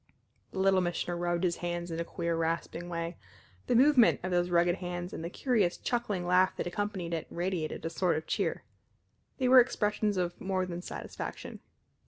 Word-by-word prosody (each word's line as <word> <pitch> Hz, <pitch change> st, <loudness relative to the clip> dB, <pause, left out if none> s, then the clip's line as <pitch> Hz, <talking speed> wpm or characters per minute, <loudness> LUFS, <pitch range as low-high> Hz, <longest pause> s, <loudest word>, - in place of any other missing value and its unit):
The -, -, -10 dB
Little 190 Hz, 0 st, +4 dB
Missioner 175 Hz, 0 st, -2 dB
rubbed 175 Hz, 0 st, -1 dB
his 175 Hz, -2 st, +1 dB
hands 175 Hz, 0 st, -3 dB
in 165 Hz, -, -3 dB
a -, -, 0 dB
queer 170 Hz, 0 st, -2 dB
rasping 165 Hz, +1 st, -2 dB
way. 170 Hz, 0 st, -4 dB, 0.5 s
The -, -, +2 dB
movement 255 Hz, -1 st, +6 dB
of 185 Hz, -, -2 dB
those 175 Hz, 0 st, +2 dB
rugged 175 Hz, +1 st, +3 dB
hands 175 Hz, 0 st, -5 dB
and -, -, -5 dB
the 170 Hz, -, -3 dB
curious, 210 Hz, -5 st, +1 dB
chuckling 215 Hz, -7 st, -2 dB
laugh 180 Hz, +1 st, +3 dB
that -, -, -3 dB
accompanied 185 Hz, -2 st, -3 dB
it, 165 Hz, -, -3 dB
radiated 175 Hz, -3 st, -3 dB
a -, -, 0 dB
sort 180 Hz, -3 st, +1 dB
of 155 Hz, -, -5 dB
cheer. -, -, -1 dB, 0.7 s
They 255 Hz, -, +1 dB
were 255 Hz, 0 st, +9 dB
expressions 210 Hz, -4 st, +1 dB
of 175 Hz, -1 st, -2 dB
more 190 Hz, -1 st, 0 dB
than 175 Hz, -1 st, -5 dB
satisfaction. -, -, -7 dB
175 Hz, 185 wpm, -30 LUFS, 170-195 Hz, 0.7 s, were